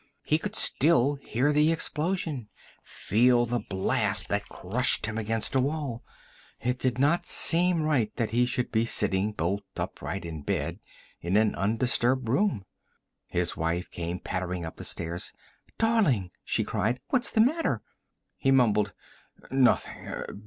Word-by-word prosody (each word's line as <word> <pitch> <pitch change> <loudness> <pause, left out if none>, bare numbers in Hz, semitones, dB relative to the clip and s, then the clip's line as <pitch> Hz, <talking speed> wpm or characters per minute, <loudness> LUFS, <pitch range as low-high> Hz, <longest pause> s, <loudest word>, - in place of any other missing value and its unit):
He 155 - +2
could - - -5
still 140 -2 +3
hear 135 +2 0
the 150 +2 +4
explosion, 160 - -2 0.3
feel 120 +3 +2
the 120 +1 -1
blast 95 -3 0
that 100 0 -2
crushed 115 +5 +2
him 110 +1 -3
against 110 +1 -3
a 135 - +3
wall. 140 -4 -3 0.6
It 125 +1 -2
did 125 -2 0
not 160 +6 +2
seem 175 -1 +4
right 135 -9 +1
that 115 -3 -2
he 120 +2 +2
should 125 0 -2
be 115 +1 +1
sitting 100 -1 +1
bolt 100 +1 -2 0.2
upright 95 0 -4
in 80 -2 -6
bed - - -2 0.4
in 90 +4 0
an 110 0 +3
undisturbed 120 +4 +1
room. 130 - +1 0.6
His 90 0 -1
wife 85 +2 -2
came 85 +1 -4
pattering 90 -2 -4
up 80 - -8
the - - -8
stairs. 85 +1 -5 0.4
"Darling!" 190 - +2
she - - 0
cried. 120 +4 -1
"What's 255 -2 +2
the 220 - +3
matter?" 310 +8 +1 0.5
He 135 - 0
mumbled, 105 -6 +3 0.6
"Nothing. 130 -2 +1
120 Hz, 145 wpm, -27 LUFS, 100-145 Hz, 0.6 s, the